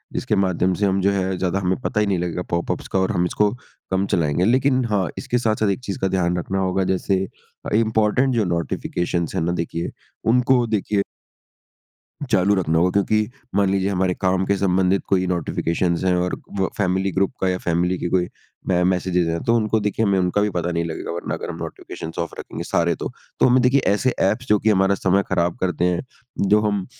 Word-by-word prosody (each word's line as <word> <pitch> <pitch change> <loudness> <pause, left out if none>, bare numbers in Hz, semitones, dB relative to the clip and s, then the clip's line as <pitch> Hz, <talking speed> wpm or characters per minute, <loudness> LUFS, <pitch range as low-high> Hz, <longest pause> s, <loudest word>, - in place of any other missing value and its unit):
इसके - - 0
माध्यम 95 -2 +1
से 105 - +2
हम 95 0 +1
जो 100 +2 +3
है 95 -1 -1
ज़्यादा 95 +1 0
हमें 95 0 0
पता 105 - -1
ही 105 - +3
नहीं 100 -2 +1
लगेगा 90 0 -2
पॉपअप्स 85 0 -2
का 95 - 0
और 95 - +1
हम 90 - +1
इसको 105 +3 +2 0.4
कम 95 +1 +1
चलाएँगे। 85 0 +1
लेकिन 130 +3 +3
हाँ, 105 -5 0
इसके 125 - -1
साथ-साथ 110 -3 +1
एक 100 - 0
चीज़ 100 - -3
का 95 - +1
ध्यान 90 -2 0
रखना 95 +2 -2
होगा 95 0 +1
जैसे 95 +1 +1 0.5
अ, - - -3
इम्पोर्टेंट 110 +4 +2
जो 110 -3 +2
नोटिफिकेशंस 85 0 -2
है - - 0
ना 85 - 0
देखिए, 85 0 -4 0.3
उनको 125 +1 +3
देखिए 105 -2 0 1.3
चालू 95 +3 +4
रखना 80 -4 +1
होगा 90 +2 +3
क्योंकि 105 +2 +1 0.3
मान 100 -1 +3
लीजिए 95 0 +1
हमारे 95 -1 +1
काम 95 +1 0
के 100 - +1
संबंधित 95 0 +2
कोई 95 -1 +2
नोटिफिकेशंस 85 0 -1
हैं 90 -1 +3
और 90 0 0 0.2
व 95 - +1
फैमिली 95 0 +1
ग्रुप 95 +2 +1
का 95 - +2
या 90 - 0
फ़ैमिली 90 +2 +1
की 85 - -3
कोई 90 -2 +1 0.4
मै 90 -1 +2
मैसेजेस 90 -1 0
हैं 85 0 -1
तो 115 - +2
उनको 110 -1 +1
देखिए 105 +2 0
हमें 100 -1 +2
उनका 90 +3 +1
भी 105 - +2
पता 90 -2 -2
नहीं 85 0 -1
लगेगा 80 -1 -5
वरना 85 +1 -4
अगर - - -6
हम - - -5
नोटिफिकेशंस 80 - -7
ऑफ 85 - -3
रखेंगे - - -6
सारे 85 0 +1
तो। - - -5 0.3
तो - - +5
हमें 130 0 +4
देखिए 130 +2 +4
ऐसे 130 +5 +1 0.2
ऐप्स 125 +5 -3
जो 105 -1 +4
कि 110 - +1
हमारा 95 -1 +3
समय 95 +1 +2
खराब 85 0 0
करते 90 -2 0
हैं। 90 -1 +1 0.5
जो 105 +2 +4
हम 100 -3 0
95 Hz, 210 wpm, -22 LUFS, 90-105 Hz, 1.3 s, तो